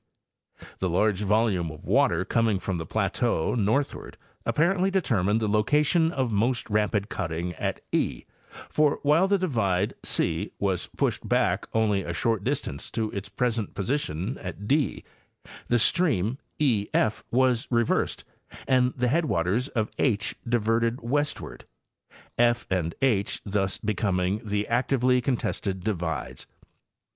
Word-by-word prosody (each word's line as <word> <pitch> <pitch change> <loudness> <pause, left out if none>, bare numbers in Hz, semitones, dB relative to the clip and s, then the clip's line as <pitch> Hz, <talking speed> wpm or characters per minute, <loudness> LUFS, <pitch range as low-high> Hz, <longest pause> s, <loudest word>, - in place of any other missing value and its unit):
The 95 - 0
large 100 +3 +1
volume 105 -4 +1
of 80 -1 -11
water - - +2
coming 115 -3 +2
from 95 -2 -3
the 80 - -5
plateau 80 - 0
northward 115 +5 -1 0.3
apparently 185 +4 +2
determined 115 - +1
the 110 - -1
location 150 - +2
of 130 -7 -1
most 115 +4 0
rapid 105 -1 +1
cutting 90 -4 -3
at - - -3
e, - - 0 0.4
for 150 -1 +2
while 155 +6 +4
the 200 0 +3
divide 110 - 0
¢ - - 0
was 95 -3 -1
pushed - - -2
back - - +1
only 105 -3 +2
a 85 -2 -4
short 110 +3 0
distance 70 - -3
to 110 -2 -2
its 100 0 -5
present 115 0 -1
position 100 - -2
at 95 +2 -7
d, 145 +2 +1 0.6
the 120 - +3
stream 130 - +2 0.2
ef 110 -5 +1
was 125 -1 +2
reversed 115 -2 +1 0.4
and 130 -1 +3
the 125 0 +1
headwaters 125 - +1
of 110 -6 -2
H 110 -6 +1 0.2
diverted 115 +1 +1
westward, 145 +5 -2 0.7
f 120 0 +3
and 85 -3 0
h 105 -7 +1
thus 95 -1 0
becoming 100 -1 0
the 105 -1 -2
actively 125 +1 +2
con 125 0 0
tested 95 -4 -3
divides. 85 -9 -3
110 Hz, 135 wpm, -26 LUFS, 95-130 Hz, 0.7 s, while